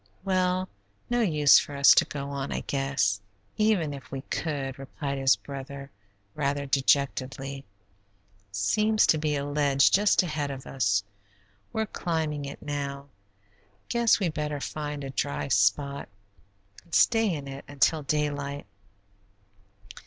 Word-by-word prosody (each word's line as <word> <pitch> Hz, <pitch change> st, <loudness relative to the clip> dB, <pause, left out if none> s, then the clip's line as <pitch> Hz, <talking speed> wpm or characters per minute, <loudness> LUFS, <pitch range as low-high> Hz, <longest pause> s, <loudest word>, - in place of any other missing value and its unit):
"Well, 185 Hz, -1 st, +1 dB, 0.4 s
no 240 Hz, 0 st, +2 dB
use 150 Hz, -9 st, +6 dB
for 145 Hz, -, -6 dB
us 140 Hz, 0 st, +7 dB
to -, -, +4 dB
go 140 Hz, -1 st, -6 dB
on, 140 Hz, -1 st, -4 dB
I -, -, -2 dB
guess, 135 Hz, -8 st, 0 dB, 0.3 s
even 210 Hz, -9 st, +2 dB
if 135 Hz, -3 st, -10 dB
we 135 Hz, -1 st, -4 dB
could," 135 Hz, -4 st, -3 dB
replied 140 Hz, +1 st, -5 dB
his 135 Hz, 0 st, +5 dB
brother, 140 Hz, 0 st, -8 dB, 0.4 s
rather 140 Hz, -1 st, -1 dB
dejectedly; 135 Hz, 0 st, 0 dB, 0.9 s
"seems 215 Hz, -, +2 dB
to 155 Hz, -, +3 dB
be 150 Hz, -1 st, 0 dB
a 140 Hz, 0 st, -2 dB
ledge 145 Hz, -1 st, +3 dB
just 205 Hz, -1 st, +4 dB
ahead 150 Hz, -4 st, -2 dB
of 135 Hz, -1 st, -7 dB
us. 100 Hz, -6 st, +1 dB, 0.7 s
We're 220 Hz, 0 st, -1 dB
climbing 160 Hz, -7 st, -2 dB
it 140 Hz, -, -8 dB
now; 140 Hz, -1 st, -4 dB, 0.8 s
guess 235 Hz, -1 st, +3 dB
we 190 Hz, -4 st, +1 dB
better 150 Hz, -2 st, -3 dB
find 150 Hz, 0 st, -5 dB
a 135 Hz, -, -5 dB
dry 140 Hz, +1 st, -2 dB
spot 130 Hz, +7 st, +1 dB, 0.7 s
and 170 Hz, -, -6 dB
stay 225 Hz, -3 st, +4 dB
in 145 Hz, -4 st, -4 dB
it 135 Hz, 0 st, -7 dB
until 145 Hz, +2 st, +2 dB
daylight." 145 Hz, -1 st, -2 dB
140 Hz, 135 wpm, -27 LUFS, 135-155 Hz, 0.9 s, us